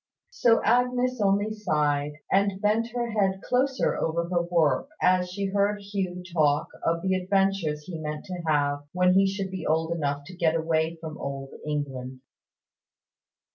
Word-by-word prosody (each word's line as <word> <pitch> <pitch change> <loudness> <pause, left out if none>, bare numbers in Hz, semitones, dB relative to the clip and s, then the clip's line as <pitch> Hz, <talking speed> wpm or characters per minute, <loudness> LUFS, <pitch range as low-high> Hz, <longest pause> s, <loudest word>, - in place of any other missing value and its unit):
So 230 -2 +3
Agnes 250 +1 +2
only 205 +2 +2
sighed, 150 -7 0 0.2
and 195 0 +2
bent 215 +2 +2
her 240 -1 -2
head 195 -3 +1
closer 260 +1 +1
over 170 +1 -1
her 175 -1 +2
work, 165 -6 +1
as 180 0 +3
she 200 +2 -3
heard 200 +1 +1
Hugh 195 -3 -4
talk 150 -3 +2
of 165 +1 0
the 190 0 +1
adventures 185 -5 +1
he 165 0 -7
meant 150 -1 -5
to 180 -2 -5
have 145 -2 +1
when 180 0 +4
he 195 +1 +5
should 195 -1 -3
be 190 -3 -5
old 160 +1 0
enough 145 -4 -1
to 180 +3 -10
get 165 -2 +2
away 160 0 0
from 160 -1 -7
Old 135 0 -5 0.2
England. 130 -3 -4
180 Hz, 160 wpm, -26 LUFS, 155-200 Hz, 0.2 s, he